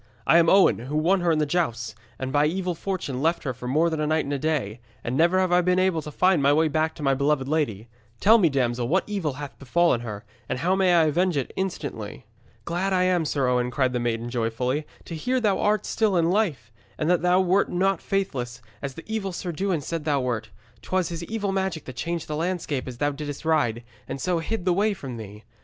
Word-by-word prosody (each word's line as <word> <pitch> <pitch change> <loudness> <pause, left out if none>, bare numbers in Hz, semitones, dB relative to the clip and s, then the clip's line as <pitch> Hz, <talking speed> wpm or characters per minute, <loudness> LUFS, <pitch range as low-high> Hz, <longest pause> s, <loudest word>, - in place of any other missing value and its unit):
I 170 - +6
am 165 -1 +4
Owen, 195 - +5
who 135 +6 -3
won 180 +5 +2
her 175 -1 +2
in 160 - +2
the 155 - +2
jousts, 120 -8 -1 0.2
and 130 0 -4
by 145 +1 +4
evil 180 +2 -1
fortune 165 -7 -4
left 165 +3 +1
her 130 - -2
for 125 +1 -8
more 155 +6 +3
than 160 -2 -2
a 150 - 0
night 155 +1 +1
and 140 - -3
a 140 - -1
day, 130 -8 -1 0.2
and 120 - -2
never 170 +5 +4
have 185 -1 +2
I 180 0 +5
been 180 +1 +2
able 185 -3 +2
to 150 - -8
find 180 +1 +3
my 140 +1 +4
way 155 +2 +3
back 155 +2 0
to 150 - -8
my 135 -1 +3
beloved 140 0 +1
lady. 120 -9 -1 0.3
Tell 225 +3 +6
me, 175 -5 +4
damsel, 120 -3 0
what 185 +8 +2
evil 195 -9 -2
hath 145 0 -8
befallen 140 -1 +2
her, 105 -3 -7 0.2
and 130 - -1
how 170 +8 0
I - - +4
may 175 -4 +4
avenge 175 +2 +1
it 135 - -3
instantly?' 145 - -4 0.4
'Glad 185 +3 -1
I 185 -1 +3
am, 180 -3 +2
Sir 140 -3 0
Owen,' 125 0 +1
cried 130 0 0
the 125 - 0
maiden 120 0 -2
joyfully, 125 +5 -1 0.2
'to - - -7
hear 250 +11 0
thou 210 -5 +1
art 210 +1 +1
still 215 -5 +1
in 170 0 +2
life, 175 - 0 0.3
and 155 - -1
that 175 -1 +3
thou 180 +1 +4
wert 190 +1 +2
not 190 0 +1
faithless, 130 -12 -2 0.2
as 135 -1 -5
the 165 - -10
evil 220 -3 -3
Sir 175 0 -4
Dewin 180 -1 -1
said 165 +2 -4
thou 145 -3 +2
wert. 120 -4 -2 0.3
'Twas 185 -2 -1
his 170 -1 -5
evil 205 -2 -2
magic 190 -5 -2
that 130 - -8
changed 170 +4 -3
the 150 - -3
landscape 160 -5 -2
as 125 -2 -7
thou 145 +3 +1
didst 145 +1 -6
ride, 120 -8 +1 0.2
and - - -5
so 175 +3 0
hid 185 +3 -3
the 180 - +3
way 205 +3 +1
from 130 -8 -7
thee. 105 -1 -10
155 Hz, 240 wpm, -25 LUFS, 130-180 Hz, 0.4 s, I